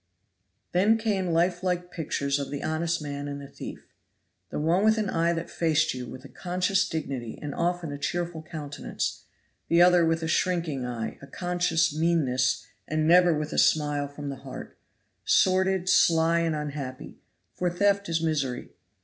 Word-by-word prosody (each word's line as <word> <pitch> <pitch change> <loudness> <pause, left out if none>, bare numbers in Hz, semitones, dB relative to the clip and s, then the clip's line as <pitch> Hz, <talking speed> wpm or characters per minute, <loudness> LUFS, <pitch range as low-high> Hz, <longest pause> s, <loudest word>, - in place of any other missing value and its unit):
Then 205 +5 +4
came 205 -5 0
life 175 +1 +1
like 180 -1 -2
pictures 140 -4 -1
of 140 - -4
the 145 - -5
honest 160 +1 -1
man 145 0 -5
and 140 0 -5
the 140 - -9
thief. - - -9 0.6
The - - -4
one 165 +6 +2
with 220 +1 +4
an 210 -3 -1
eye 165 +1 +2
that 165 0 -5
faced 160 -3 +2
you, 125 -1 -6
with 130 +3 -10
a - - -8
conscious 185 +4 0
dignity 135 -7 -4
and 145 -1 -5
often 175 -2 -1
a 145 - -6
cheerful 175 0 -2
countenance; 155 -3 -5 0.4
the 170 +1 +5
other 180 -1 +6
with 165 0 +1
a - - -1
shrinking 160 -6 0
eye, 115 -2 -4
a 140 - -11
conscious 175 -1 0
meanness, 150 -6 +1 0.2
and 155 0 0
never 175 -1 +6
with 150 0 -3
a - - +2
smile 145 -2 +2
from 145 0 -7
the 140 - -5
heart; - - -9 0.5
sordid, 190 0 +3
sly 165 -2 +4
and 165 -2 0
unhappy 145 -3 -6 0.3
for 180 - 0
theft 200 +2 +1
is 165 0 0
misery. 140 -6 -1
165 Hz, 170 wpm, -27 LUFS, 145-180 Hz, 0.6 s, other